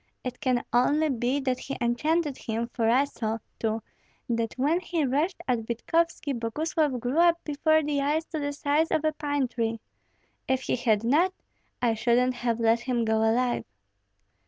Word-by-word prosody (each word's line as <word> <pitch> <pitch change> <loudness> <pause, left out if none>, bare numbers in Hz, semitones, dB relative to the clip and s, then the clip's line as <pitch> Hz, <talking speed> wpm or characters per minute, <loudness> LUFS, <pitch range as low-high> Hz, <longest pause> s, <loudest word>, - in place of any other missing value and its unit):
It 250 -1 -5
can 250 -2 +1
only 290 +6 +3
be 250 +1 0
that 255 -2 -1
he 275 - -5
enchanted 290 +5 +1
him, 230 0 -4
for 225 -2 +1
I 255 +4 +5
saw, 225 -6 -3 0.2
too, 220 -1 -1 0.4
that 230 -1 -1
when 295 +7 +2
he 340 -4 -1
rushed 295 +8 0
at 250 -2 +2
Vitkovski 305 +5 0
Boguslav 290 +4 -1
grew 250 +7 -1
up 340 0 +5
before 315 +1 +2
the 290 -1 0
eyes 300 +3 0
to 315 - -1
the 285 -1 -2
size 290 +2 +1
of 315 - 0
a 310 - +2
pine 290 -3 -1
tree. 230 -2 -2 0.7
If 260 0 0
he - - 0
had 225 -3 +1
not, 310 +10 +3 0.5
I 235 -2 +3
shouldn't 240 +3 +2
have 240 -1 -1
let 230 0 +3
him 240 -1 -1
go 220 0 +2
alive." 240 +3 +1
255 Hz, 175 wpm, -27 LUFS, 235-300 Hz, 0.7 s, I